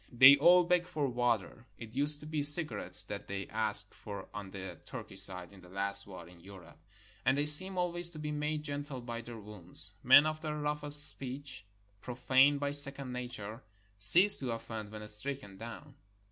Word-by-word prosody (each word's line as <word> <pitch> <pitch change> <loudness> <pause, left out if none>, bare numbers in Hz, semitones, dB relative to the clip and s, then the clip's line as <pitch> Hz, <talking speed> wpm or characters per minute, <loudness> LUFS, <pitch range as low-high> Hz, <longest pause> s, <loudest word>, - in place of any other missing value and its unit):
They 130 +3 +4
all 175 +5 +1
beg 175 0 -4
for 155 -6 -7
water 120 -1 -6
(it 115 -1 -15
used 145 +1 0
to - - -14
be 155 -1 -7
cigarettes 150 +2 +6
that - - -12
they 95 -1 -9
asked - - +2
for 100 -1 -14
on 100 -2 -12
the 95 -3 -13
Turkish - - -9
side 90 0 -10
in 95 - -20
the 90 - -21
last 100 +1 -8
war 90 -4 -15
in 85 0 -21
Europe), 90 -3 -19 0.4
and 130 +2 -3
they 145 - -4
seem 185 +6 +4
always 175 -1 -5
to 170 - -15
be 150 0 -9
made 150 0 -7
gentle 145 -2 -10
by 120 -1 -11
their 120 0 -14
wounds. 100 -3 -2
Men 135 +4 +3
of 155 0 -7
the 155 -1 -8
rough 150 0 -8
est 145 0 +7
speech, 130 -4 -13 0.3
profaae 130 +3 -2
by 140 0 -7
second 140 -2 +2
nature, 120 -2 -11 0.4
cease 180 - +6
to 130 - -7
offend 115 -2 -12
when 105 0 -13
stricken 105 -1 -9
down. 115 +6 -14
130 Hz, 190 wpm, -27 LUFS, 105-150 Hz, 0.4 s, est